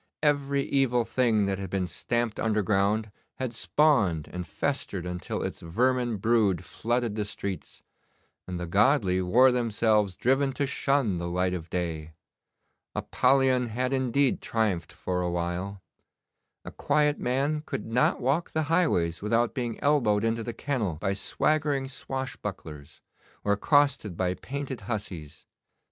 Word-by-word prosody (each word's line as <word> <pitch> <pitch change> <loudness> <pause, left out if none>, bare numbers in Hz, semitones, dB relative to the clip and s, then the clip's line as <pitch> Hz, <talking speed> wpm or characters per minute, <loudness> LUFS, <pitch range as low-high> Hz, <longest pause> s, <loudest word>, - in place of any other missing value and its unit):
Every 140 -2 +2
evil 125 -4 +1
thing 115 -3 +2
that 100 -1 -1
had 95 -2 -5
been 95 0 -1
stamped 120 +4 -2
underground 105 0 +1 0.2
had 130 -2 -4
spawned 115 - +2
and 90 0 -5
festered 100 -10 -2
until 90 0 -4
its - - -4
vermin 120 +6 +1
brood 105 -4 +2
flooded 120 -1 -1
the 105 0 -1
streets, 100 -3 -6 0.6
and 90 -1 -4
the 90 - -3
godly 100 - +3
wore 125 +9 +5
themselves 110 -5 +1
driven 135 +2 +1
to 140 +2 0
shun 135 -8 +1
the 85 - -3
light 90 +1 0
of 85 -2 -5
day. 80 -3 -3 0.8
Apollyon 130 -1 +2
had 125 +4 -1
indeed 130 +1 +1
triumphed 105 -7 -1
for 90 -1 -3
a 90 - -1
while. 90 +3 -3 0.8
A - - -6
quiet 150 -1 +1
man 140 +5 0
could 105 - -5
not 115 +3 +2
walk 140 +7 0
the 160 - +1
highways 85 - +2
without 115 +3 +1
being 120 -4 -3
elbowed 120 -8 +3
into 115 0 0
the 120 - -4
kennel 115 - -2
by 95 +5 -1
swaggering 145 +6 0
swashbucklers, 100 - -6 0.4
or 100 - +1
accosted 140 - +2
by 90 -1 +1
painted 135 +2 -6
hussies. 100 -8 -6
115 Hz, 140 wpm, -27 LUFS, 95-130 Hz, 0.8 s, wore